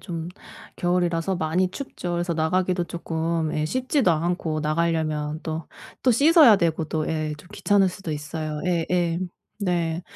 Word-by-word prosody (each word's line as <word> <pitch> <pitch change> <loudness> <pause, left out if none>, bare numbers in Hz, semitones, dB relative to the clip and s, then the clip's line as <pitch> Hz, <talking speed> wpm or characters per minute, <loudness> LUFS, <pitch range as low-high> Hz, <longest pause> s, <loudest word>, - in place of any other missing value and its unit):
좀 170 -3 -5 0.5
겨울이라서 175 0 0
많이 175 +3 +1
춥죠. 185 -8 -5
그래서 175 0 -1
나가기도 175 +3 +1
쪼끔 165 -1 -2
예 155 0 0
씻지도 255 - +1
않고 165 -1 0
나가려면 155 -1 0
또 160 0 -4 0.4
또 255 - +4
씻어야 285 - +7
되고 165 -4 0
또 155 0 -2
예 155 -1 -2
좀 150 - -16
귀찮을 200 -2 +3
수도 180 -2 -7
있어요. 150 0 -4
예예. 175 -1 +1 0.4
네. 175 -4 -1
170 Hz, 295 characters per minute, -24 LUFS, 160-180 Hz, 0.5 s, 씻어야